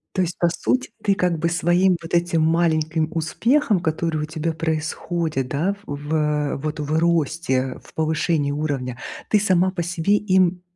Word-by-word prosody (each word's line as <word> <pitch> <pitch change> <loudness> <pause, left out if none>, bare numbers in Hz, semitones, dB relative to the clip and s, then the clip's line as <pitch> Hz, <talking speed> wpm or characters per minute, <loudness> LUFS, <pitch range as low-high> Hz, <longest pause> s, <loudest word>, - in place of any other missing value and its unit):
То 185 - +2
есть 175 0 -3
по 175 - +3
сути, 255 +9 -1
ты 200 - +3
как 180 -4 0
бы 170 - +1
своим 175 +2 +3
вот 165 0 -6
этим 170 -1 +2
маленьким 160 -1 +1
успехам, 210 - +1
который 160 -1 -1
у - - -1
тебя 160 +1 -2
происходит, 160 -2 -2
да. 165 +9 0
В 145 - -4
в, 150 +2 -2
э, 150 -2 0
вот 155 +2 -4
в 150 +1 -1
росте, 160 -3 +1
э, 130 0 -1
в - - -18
повышении 155 -2 0
уровня, 140 -4 -2 0.3
ты 210 - +3
сама 185 -2 +3
по 175 - -2
себе 175 +3 0
им, 185 -3 +2
165 Hz, 180 wpm, -22 LUFS, 155-175 Hz, 0.3 s, по